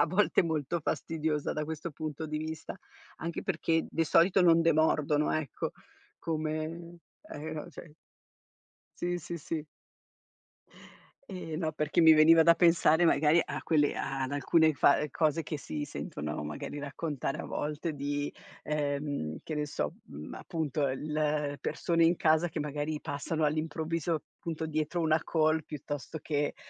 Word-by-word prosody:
a 145 Hz, -, +5 dB
volte 190 Hz, +3 st, +3 dB
molto 160 Hz, 0 st, -1 dB
fastidiosa, 155 Hz, -1 st, -1 dB
da 150 Hz, -, -2 dB
questo 160 Hz, +2 st, -5 dB
punto 155 Hz, +1 st, -5 dB
di 155 Hz, 0 st, -3 dB
vista. 160 Hz, 0 st, -6 dB, 0.4 s
Anche 165 Hz, +1 st, -4 dB
perché 165 Hz, 0 st, 0 dB
di 165 Hz, -, +1 dB
solito 175 Hz, +5 st, +4 dB
non 165 Hz, -2 st, +6 dB
demordono, 155 Hz, -2 st, +3 dB
ecco. 155 Hz, -4 st, -2 dB, 0.5 s
Come 160 Hz, +2 st, -3 dB, 0.3 s
e 155 Hz, +1 st, -6 dB
o 150 Hz, -, -7 dB
ce 155 Hz, -1 st, -12 dB, 1.0 s
Sì, 175 Hz, 0 st, -1 dB
sì, 170 Hz, +1 st, -6 dB
sì. 155 Hz, 0 st, -4 dB, 1.7 s
Eh, 180 Hz, -4 st, -5 dB
no, 160 Hz, -1 st, -1 dB
perché 150 Hz, +2 st, +1 dB
mi 160 Hz, -, +9 dB
veniva 160 Hz, +1 st, +7 dB
da 170 Hz, -, +7 dB
pensare, 170 Hz, -1 st, +4 dB
magari, 155 Hz, +1 st, +4 dB
a -, -, -5 dB
quelle 150 Hz, -3 st, +2 dB
a 135 Hz, -1 st, -2 dB
ad 130 Hz, -, -3 dB
alcune 155 Hz, +2 st, +3 dB
fa 145 Hz, +2 st, +4 dB
cose 155 Hz, +2 st, +1 dB
che 155 Hz, -, -4 dB
si 145 Hz, +1 st, -4 dB
sentono 75 Hz, -, -5 dB
magari 75 Hz, -, -5 dB
raccontare 145 Hz, -1 st, -3 dB
a -, -, -5 dB
volte 150 Hz, +2 st, -3 dB
di 145 Hz, 0 st, -2 dB, 0.3 s
ehm, 145 Hz, -, -2 dB
che 155 Hz, -, -4 dB
ne 150 Hz, 0 st, -1 dB
so, 75 Hz, -, -3 dB
uhm, 75 Hz, +2 st, -8 dB
appunto, 155 Hz, -4 st, -2 dB
il 150 Hz, +1 st, -1 dB
persone 170 Hz, -1 st, +1 dB
in 170 Hz, +2 st, +4 dB
casa 160 Hz, +2 st, +3 dB
che 160 Hz, -, -4 dB
magari 150 Hz, +1 st, -2 dB
passano 155 Hz, +1 st, -2 dB
all'improvviso, 160 Hz, +1 st, -1 dB, 0.2 s
punto 160 Hz, -1 st, -4 dB
dietro 155 Hz, +2 st, -1 dB
una 155 Hz, 0 st, +3 dB
call, 155 Hz, -1 st, +2 dB
piuttosto 145 Hz, 0 st, -6 dB
che, 145 Hz, -1 st, -1 dB
155 Hz, 150 wpm, -30 LUFS, 145-165 Hz, 1.7 s, mi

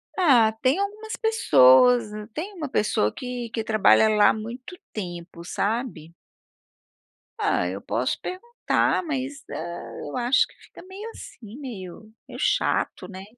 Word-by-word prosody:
Ah, 255 Hz, -, +5 dB
tem 265 Hz, +8 st, +2 dB
algumas 425 Hz, +2 st, -4 dB
pessoas, 240 Hz, -, +5 dB, 0.2 s
tem 380 Hz, +7 st, -5 dB
uma 310 Hz, -6 st, -5 dB
pessoa 110 Hz, -, +1 dB
que 245 Hz, -2 st, -5 dB
que 225 Hz, -1 st, -3 dB
trabalha 215 Hz, -, +4 dB
lá 210 Hz, -1 st, +5 dB
há -, -, +3 dB
muito 235 Hz, +9 st, -8 dB, 0.2 s
tempo, 175 Hz, -4 st, -7 dB
sabe. 205 Hz, -5 st, -3 dB, 1.3 s
Ah, 90 Hz, -, +1 dB
eu 95 Hz, +2 st, -5 dB
posso 125 Hz, -, -2 dB
perguntar, 460 Hz, -1 st, -1 dB
mas, 275 Hz, -2 st, -4 dB
hã, -, -, -6 dB, 0.5 s
eu 145 Hz, -, -5 dB
acho 250 Hz, +3 st, +3 dB
que -, -, -22 dB
fica -, -, -16 dB
meio 390 Hz, +4 st, -9 dB
assim, 225 Hz, -, -11 dB
meio 215 Hz, -4 st, -9 dB, 0.2 s
meio -, -, -9 dB
chato, -, -, 0 dB
né. 190 Hz, -1 st, -9 dB
240 Hz, 140 wpm, -24 LUFS, 195-305 Hz, 1.3 s, Ah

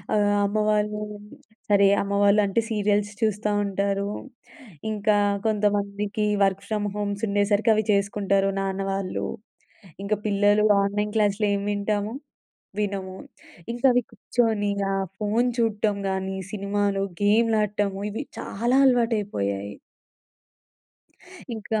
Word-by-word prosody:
ఆహ్, 205 Hz, 0 st, +3 dB
అమ్మవాళ్ళు 210 Hz, 0 st, 0 dB, 0.7 s
సరే 200 Hz, -1 st, +5 dB, 0.2 s
అమ్మవాళ్ళు 200 Hz, +1 st, +3 dB
అంటే 200 Hz, +4 st, +1 dB
సీరియల్స్ 205 Hz, -1 st, +1 dB
చూస్తా 210 Hz, -1 st, 0 dB
ఉంటారు. 200 Hz, 0 st, -1 dB, 0.8 s
ఇంకా 210 Hz, 0 st, +1 dB, 0.3 s
కొంతమందికి 205 Hz, 0 st, 0 dB, 0.2 s
వర్క్ 195 Hz, 0 st, +1 dB
ఫ్రమ్ 210 Hz, -1 st, -1 dB
హోమ్స్ 205 Hz, 0 st, -3 dB
ఉండేసరికి 205 Hz, +2 st, +2 dB
అవి 215 Hz, -, +1 dB
చేసుకుంటారు 200 Hz, -1 st, +1 dB
నాన్న 195 Hz, 0 st, -2 dB
వాళ్ళు. 195 Hz, -1 st, -2 dB, 0.8 s
ఇంక 200 Hz, -, -4 dB
పిల్లలు 205 Hz, +1 st, +3 dB, 0.2 s
ఆన్లైన్ 210 Hz, +1 st, -1 dB
క్లాసులేం 205 Hz, -1 st, +2 dB
వింటాము? 205 Hz, +1 st, -1 dB, 0.7 s
వినము. 195 Hz, -2 st, -3 dB, 0.6 s
ఇంకా 240 Hz, +3 st, +1 dB
అవి 245 Hz, 0 st, +2 dB
కూర్చొని 220 Hz, -1 st, 0 dB, 0.2 s
ఆ -, -, 0 dB, 0.2 s
ఫోన్ 220 Hz, +4 st, +1 dB
చూడటం 215 Hz, -2 st, +1 dB
గాని 190 Hz, 0 st, -2 dB, 0.2 s
సినిమాలు, 200 Hz, -1 st, -1 dB, 0.2 s
గేమ్‌లాడటము 210 Hz, -2 st, +2 dB
ఇవి 225 Hz, +7 st, -4 dB, 0.2 s
చాలా 240 Hz, +5 st, -1 dB
అలవాటైపోయాయి. 200 Hz, -, 0 dB, 1.8 s
ఇంకా 220 Hz, 0 st, -2 dB
205 Hz, 100 wpm, -25 LUFS, 200-215 Hz, 1.8 s, సరే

